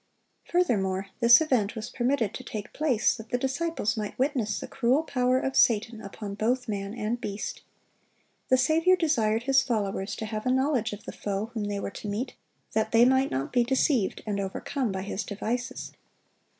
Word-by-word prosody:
Furthermore, 195 - 0
this 235 +3 +8
event 245 -8 +1
was 220 +1 -6
permitted 245 -4 0
to 255 - -7
take 215 -4 -7
place 275 -8 +2
that 225 -1 -10
the 245 - +1
disciples 265 -2 -1
might 210 -2 -4
witness 255 -6 0
the - - -6
cruel 265 +4 +1
power 255 -4 +1
of 270 0 -2
Satan 225 -3 +3
upon 200 +1 -7
both 240 +5 0
man 200 0 -3
and 235 +1 -2
beast. 205 -3 -4 0.9
The 255 - +5
Saviour 320 +8 +4
desired 235 - +1
His 270 +1 +4
followers 200 -5 -2
to 220 - -5
have 215 +1 -4
a - - +3
knowledge 260 -4 +1
of 205 0 -8
the - - -5
foe 205 +2 -3
whom 220 -3 -2
they 205 -1 -2
were 200 - -4
to 210 - -8
meet, 210 +6 -3 0.4
that 220 0 0
they 230 +1 +6
might 265 +1 +3
not 135 +1 -3
be 245 - +4
deceived 255 -3 +1
and 205 -2 -2
overcome 215 +5 -2
by 190 0 -3
his 200 +1 -3
devices. 230 +4 -4
230 Hz, 185 wpm, -27 LUFS, 210-260 Hz, 0.9 s, this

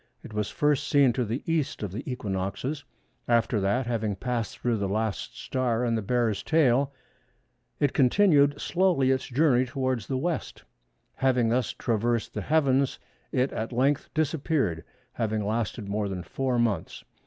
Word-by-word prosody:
It - - -10
was 105 -1 -1
first 145 -3 +1
seen 140 -4 +4
to 125 - 0
the 115 +4 -3
E. 165 -2 +2 0.2
of 105 -4 -3
the 105 +6 -4
equinoxes; 110 +6 -3 0.4
after 115 -1 +2
that, 100 +7 +1
having 110 -4 -1
passed 120 +1 -3
through 120 -2 0
the 100 -2 -2
last 110 -3 -2
star 125 -2 -1
in 115 - +1
the 110 - 0
Bear's 115 -1 0
tail, 140 -3 +3 0.9
it 145 -2 +2
continued 145 0 +4
slowly 175 -8 +2
its 130 0 0
journey 130 -1 +3
towards 130 -4 -2
the 135 - -2
W. 165 +4 0 0.8
Having 125 -3 +2
thus 120 0 0
traversed 115 0 -1
the - - -3
heavens, 140 -3 +2 0.3
it 130 +2 +1
at 110 +2 -3
length 135 +4 +1
disappeared, 145 - 0 0.3
having 110 -2 -1
lasted 110 0 -2
more 100 0 -1
than 90 -2 -4
four 130 +5 -1
months. 115 -4 -1
125 Hz, 155 wpm, -27 LUFS, 110-140 Hz, 0.9 s, seen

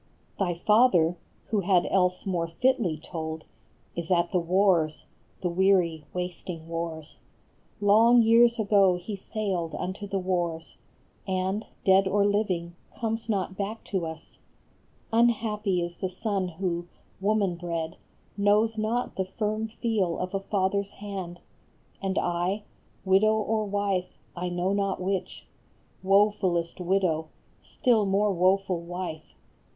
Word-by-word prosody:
Thy 180 -3 0
father, 180 -4 +4 0.3
who 215 - +1
had 185 -2 +3
else 180 -1 +1
more 175 -4 -1
fitly 210 - +1
told, 160 0 -6 0.5
Is 170 -1 -4
at 175 -2 +2
the 180 - +2
wars, 175 -3 +2 0.4
the 180 - 0
weary, 175 -4 +2
wasting 180 -2 -5
wars; 165 -2 -5 0.6
Long 225 +4 +6
years 235 +1 +5
ago 200 -4 +4
he 180 +4 -5
sailed 190 -5 -3
unto 190 +3 -4
the 195 - -2
wars, 175 -3 -2 0.5
And, 190 +2 -1 0.2
dead 190 0 +5
or 200 +1 +2
living, 185 -5 0 0.2
comes 225 0 -2
not 190 -3 -1
back 205 +3 -4
to 180 -4 0
us. 160 0 -10 0.7
Unhappy 215 -5 +2
is 175 0 -6
the 185 - -2
son 195 0 -2
who, 175 0 -3 0.3
woman 200 -1 +1
bred, 170 -1 -4 0.4
Knows 210 +2 +2
not 230 +3 -1
the 190 - 0
firm 215 +3 -2
feel 215 -6 -1
of 180 +1 -4
a 195 - 0
father 195 0 0
s 200 - -12
hand; 190 -4 -7 0.6
And 190 -1 -2
I, 175 +4 0 0.4
widow 195 +3 +4
or 215 0 0
wife, 200 -2 -1 0.2
I 180 0 -3
know 175 +2 0
not 200 -1 0
which, 190 +1 -3 0.6
Wofulest 190 -4 +2
widow, 175 -4 +1 0.3
still 225 -5 +1
more 200 +1 +2
woful 185 0 +2
wife! 170 -2 -6
190 Hz, 130 wpm, -27 LUFS, 175-205 Hz, 0.7 s, Long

